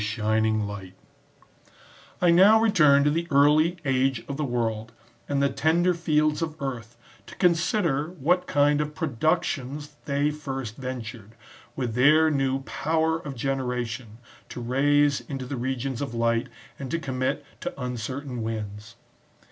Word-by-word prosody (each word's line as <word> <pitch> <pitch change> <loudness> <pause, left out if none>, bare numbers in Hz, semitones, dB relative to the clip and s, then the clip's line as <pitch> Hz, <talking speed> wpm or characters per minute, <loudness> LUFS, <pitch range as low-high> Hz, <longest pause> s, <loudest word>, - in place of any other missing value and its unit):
shining 110 0 0
light,) 95 -2 -8 1.3
I 175 - +6
now 195 +6 +7
return 155 -11 +5
to 145 - +3
the 165 +2 -1
early 150 +4 +4
age 135 -1 +1
of 140 - -4
the 150 - -2
world, 115 -3 -2 0.4
and 140 -1 +1
the 140 - +3
tender 170 +5 +2
fields 155 -2 +1
of 160 -1 -4
earth, 120 -4 -5 0.3
to - - -11
consider 170 -4 +1
what 180 +2 0
kiTid 145 0 +3
of 150 0 -3
productions 150 -1 -1
they 145 +1 +1
first 135 -6 -6
ventured,* 115 -4 -7 0.4
with 125 -4 -3
their 155 +6 +5
new 135 -1 0
power 160 +3 0
of 140 -4 -7
generation, 125 -3 -3 0.3
to - - -7
raise 140 +3 +2
into 135 -3 -6
the 135 - -4
regions 130 +1 -3
of 135 -4 -4
light, 115 0 +1 0.3
and 135 -2 -6
to 165 - -1
commit 135 -1 -2
to - - -6
uncertain 125 +1 -4
winds. 110 0 -5
135 Hz, 140 wpm, -25 LUFS, 120-150 Hz, 1.3 s, now